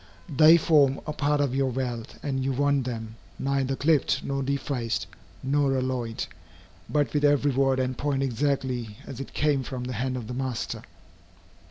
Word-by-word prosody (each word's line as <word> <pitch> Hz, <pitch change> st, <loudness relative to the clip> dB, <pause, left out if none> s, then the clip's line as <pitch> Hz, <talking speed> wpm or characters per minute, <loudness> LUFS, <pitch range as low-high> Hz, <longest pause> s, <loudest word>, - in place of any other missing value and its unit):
They 155 Hz, +4 st, +8 dB
form 145 Hz, -5 st, +4 dB
a 150 Hz, -, -3 dB
part 145 Hz, 0 st, +1 dB
of 140 Hz, -3 st, 0 dB
your 135 Hz, 0 st, +1 dB
wealth, 125 Hz, -2 st, -4 dB
and 135 Hz, -2 st, -1 dB
you 135 Hz, 0 st, 0 dB
want 140 Hz, 0 st, +2 dB
them, 115 Hz, -2 st, -5 dB, 0.2 s
neither 135 Hz, -1 st, 0 dB
clipped, 150 Hz, +1 st, +2 dB
nor 135 Hz, 0 st, -2 dB
defaced, 135 Hz, -3 st, -1 dB, 0.4 s
nor 135 Hz, 0 st, +2 dB
alloyed, 125 Hz, -3 st, -2 dB, 0.6 s
but 145 Hz, -2 st, +1 dB
with 150 Hz, -1 st, +1 dB
every 145 Hz, -1 st, +4 dB
word 135 Hz, 0 st, +2 dB
and 130 Hz, 0 st, 0 dB
point 140 Hz, 0 st, 0 dB
exactly 125 Hz, -4 st, -1 dB
as 130 Hz, -, -8 dB
it 135 Hz, -, -7 dB
came 145 Hz, -2 st, +2 dB
from 130 Hz, -1 st, -5 dB
the 125 Hz, 0 st, -4 dB
hand 130 Hz, +2 st, -2 dB
of 120 Hz, -, -5 dB
the 125 Hz, -, -6 dB
master. 130 Hz, -2 st, -3 dB
135 Hz, 170 wpm, -26 LUFS, 125-145 Hz, 0.6 s, They